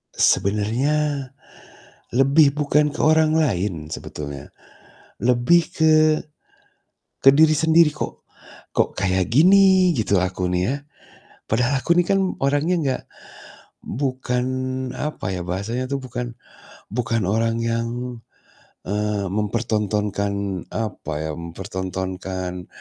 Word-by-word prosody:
Sebenarnya 130 +8 +1 0.8
lebih 140 +4 +4
bukan 150 0 +2
ke 150 - -9
orang 155 0 +4
lain 95 - -1
sebetulnya. 70 -3 -7 0.7
Lebih 125 +8 +4
ke 160 -1 +2 1.3
ke 135 - +10
diri 155 +1 +5
sendiri 160 +1 +5
kok. - - -6 0.5
Kok - - +1
kayak 95 0 0
gini 185 +3 +6
gitu 100 -4 +1
aku 90 0 -1
nih 90 0 +1
ya. 140 - 0 0.7
Padahal 125 +4 +1
aku 170 0 +2
ini 175 - +5
kan 195 +2 +2 0.2
orangnya 145 +6 +1
nggak 135 -3 -1 0.8
bukan 130 -1 -2 0.5
apa 150 -10 -4
ya, 90 - -3
bahasanya 105 +8 -3
tuh 140 -1 -2
bukan 125 -1 -5 0.6
bukan 115 -2 -1
orang 115 +2 +1
yang, 115 0 -1 1.0
eee, 105 0 -1
mempertontonkan 105 -2 -1
apa 105 -7 -4
ya, 80 - -3
mempertontonkan, 95 0 -5
115 Hz, 105 wpm, -22 LUFS, 95-145 Hz, 1.3 s, ke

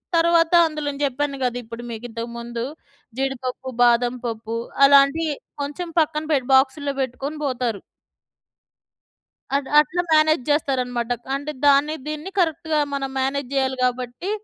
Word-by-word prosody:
తరువాత 335 0 +4 0.2
అందులో 305 -1 -5
నేను 280 0 -6
జెప్పాను 280 +1 -2
గదా! 245 -1 0
ఇప్పుడు 230 +1 -9
మీకు 225 +1 -7
ఇంతకు 230 +1 -6
ముందు 235 0 -5 0.6
జీడిపప్పు, 265 -1 -3
బాదం 240 +1 +3
పప్పు 225 0 -4 0.3
అలాంటియి 280 +3 +5 0.3
కొంచెం 315 +5 -5
పక్కన 305 0 0
పెట్ 260 -4 0
బాక్సుల్లో 280 +2 +2
బెట్టుకొని 270 +4 -5
బోతారు. 245 -6 -2 1.8
అట్ 280 -1 -5
అట్లా 330 +4 +1
మ్యానేజ్ 310 -3 +4
జేస్తారనమాట. 250 -5 0 0.2
అంటే 285 +2 -4 0.2
దాన్ని 285 +2 +4
దీన్ని 305 +5 -5
కరెక్ట్‌గా 320 -2 +1
మనం 275 -1 -2
మ్యానేజ్ 270 0 -1
జేయాలి 265 -1 0
కాబట్టి 250 +7 -2
275 Hz, 130 wpm, -22 LUFS, 245-300 Hz, 1.8 s, అలాంటియి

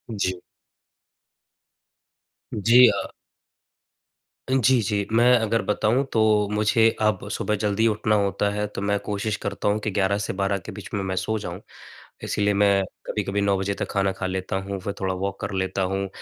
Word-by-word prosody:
जी। 95 -2 -1 2.2
जी, 120 +4 +6
अ। - - 0 1.4
जी, 130 -1 +4
जी, 100 0 -1
मैं 120 +2 +5
अगर 115 -1 0
बताऊँ 110 +6 +1
तो 110 - +2 0.3
मुझे 105 +2 +3
अब 105 -2 +1
सुबह 105 - -1
जल्दी 105 +2 +2
उठना 105 0 +1
होता 100 0 +1
है 105 0 -2
तो - - -3
मैं 100 0 +1
कोशिश 105 +1 -1
करता - - -4
हूँ 105 +1 +2
कि 110 - -1
11 100 0 +1
से 100 - -3
12 100 +1 0
के - - -6
बीच - - -9
में 100 - -1
मैं 95 0 -2
सो 110 +4 -1
जाऊँ। 85 -4 -6 0.6
इसीलिए 105 0 0
मैं 100 -1 +3 0.2
कभी-कभी 100 -1 -1
9 100 -1 +2
बजे 95 +1 -1
तक - - -4
खाना 95 -1 +1
खा 95 0 -5
लेता 95 0 -3
हूँ 100 -1 -4
फिर 100 +1 -4
थोड़ा 95 -1 -1
वॉक 95 +1 -4
कर 100 - -3
लेता 95 0 -1
हूँ। 95 +1 -1
100 Hz, 175 wpm, -24 LUFS, 95-105 Hz, 2.2 s, जी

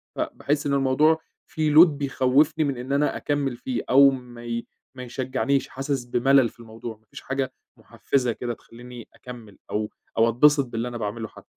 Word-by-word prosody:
فباحِس 145 +1 -2
إن 140 - 0
الموضوع 140 +4 +3 0.3
فيه 155 -1 -1
load 170 +3 +10
بيخوِّفني 140 +1 +1
من 140 -3 -2
إن 125 +2 -6
أنا 145 +1 +1
أكمّل 145 -3 -1
فيه 125 0 -3
أو 140 +1 +7
ما 125 -2 -9
ي 115 0 -3 0.3
ما 130 - -7
يشجّعنيش، 130 +2 -1
حاسِس 135 -1 -3
بمَلَل 125 +1 +3
في - - -25
الموضوع، 115 0 -9
ما 110 - -36
فيش - - -11
حاجة 135 -1 -3 0.2
مُحفّزة 125 -3 -1
كده 120 +1 -4
تخلّيني 120 +1 -12
أكمّل 120 -5 -12
أو 105 0 -1 0.3
أو 115 +1 +4
أتبسط 140 +4 +4
باللي 120 0 -4
أنا 120 - -5
باعمله 110 +1 -4
حتّى. - - -16
130 Hz, 175 wpm, -24 LUFS, 120-140 Hz, 0.3 s, load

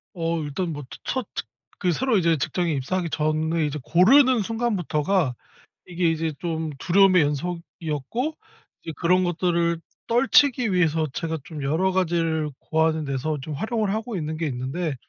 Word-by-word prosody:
어 165 0 -1
일단 155 +4 -3
뭐 145 -2 -6
츠 - - -9
첫 260 -4 -2
츳 - - -3 0.3
그 180 -2 +1
새로 255 +6 +1
이제 170 -2 +3
직장에 170 +4 -1
입사하기 170 +6 -2
전에 155 +1 0
이제 150 +1 -3
고르는 245 - +5
순간부터가 190 - 0 0.5
이게 175 -1 0
이제 160 0 -1
좀 160 -2 -2
두려움의 185 0 +5
연속이었고 165 - -3 0.5
이제 160 - -5
그런 180 +2 +2
것들을 170 -1 0 0.3
떨치기 250 -1 +4
위해서 160 -3 +2
제가 160 -1 -2
좀 155 -3 -8
여러 160 +7 +1
가지를 165 -4 0
고하는 160 0 +1
데서 140 +3 -2
좀 155 +3 -6
활용을 215 - -1
하고 220 0 -3
있는 155 -2 -3
게 165 - -1
있는데 135 +5 -3
170 Hz, 330 characters per minute, -24 LUFS, 155-185 Hz, 0.5 s, 고르는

